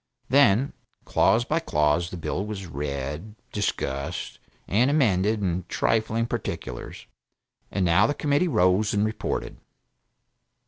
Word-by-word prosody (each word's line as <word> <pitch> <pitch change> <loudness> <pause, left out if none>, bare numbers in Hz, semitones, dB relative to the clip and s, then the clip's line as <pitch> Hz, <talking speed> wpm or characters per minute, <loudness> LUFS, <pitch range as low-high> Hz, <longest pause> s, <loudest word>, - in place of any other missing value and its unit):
Then, 135 -1 +4 0.3
clause 115 +2 +3
by 155 +5 +1
clause 75 - +1
the 90 - -7
bill 90 +3 -2
was 105 -2 -5
read, 75 +6 -5 0.2
discussed, 70 -9 -3 0.3
and 115 +8 +3
amended 110 -7 +2
in 90 -1 -1
trifling 110 +1 +1
particulars, 110 - -5 0.6
and 95 -2 0
now 90 +6 +4
the 145 - -1
Committee 145 +5 +1
rose 95 - +2
and 105 +1 +2
reported. 110 +1 -3
105 Hz, 120 wpm, -25 LUFS, 85-115 Hz, 0.6 s, Then